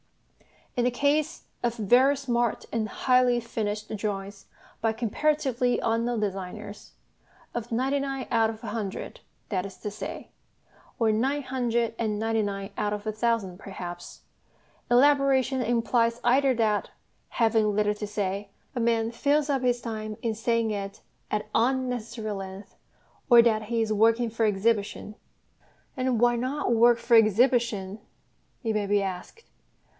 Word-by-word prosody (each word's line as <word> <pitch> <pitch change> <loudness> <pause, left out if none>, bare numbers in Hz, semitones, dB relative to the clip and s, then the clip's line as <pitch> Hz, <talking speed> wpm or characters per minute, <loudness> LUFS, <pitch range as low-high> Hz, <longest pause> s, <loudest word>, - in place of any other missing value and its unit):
In 245 - +1
the - - +4
case 290 +5 0 0.2
of 240 -1 0
very 245 +6 +4
smart 240 -4 -1
and 225 -2 -1
highly 250 0 +3
finished 215 -2 -4
drawings 200 -1 -5 0.3
by 225 -1 +1
comparatively 250 +2 0
unknown 230 0 0
designers 205 +1 -5 0.6
of 240 0 -5
ninety 265 +4 +1
nine 270 -1 -3
out 225 -1 +3
of 220 +1 -8
a - - -6
hundred, 210 -3 -5 0.3
that 185 -3 -1
is 195 -1 -9
to 210 - -5
say, 200 -1 -7 0.7
or 225 -2 +3
nine 270 +7 0
hundred 235 -3 -1
and 215 -2 -1
ninety 225 +1 0
nine 200 -1 -4
out 210 0 0
of 210 0 -5
a 215 - -1
thousand 215 -4 -1
perhaps 175 -2 -8 0.7
elaboration 265 0 +4
implies 235 0 +1
either 260 +2 +3
that, 215 -3 +1 0.4
having 220 -3 +2
little 210 0 +2
to 210 0 -6
say, 200 -1 -3 0.2
a 250 - -3
man 230 -1 +1
fills 290 +4 +1
up 270 -2 0
his 245 -1 +1
time 215 -2 -5
in 230 -2 0
saying 230 0 0
it 200 -1 -5 0.3
at 210 0 -2
unnecessary 235 -3 -1
length, 195 0 -7 0.5
or 240 -2 +9
that 220 -2 +2
he 230 +1 -1
is 215 -1 -1
working 225 +2 +3
for 230 0 0
exhibition. 210 0 0 0.8
And 255 -3 0
why 240 0 +4
not 255 +1 -1
work 235 +1 +5
for 235 0 +2
exhibition? 225 -2 +2 0.6
it 225 -2 0
may 210 -1 -1
be 205 0 +2
asked. 190 - -6
230 Hz, 145 wpm, -27 LUFS, 210-245 Hz, 0.8 s, or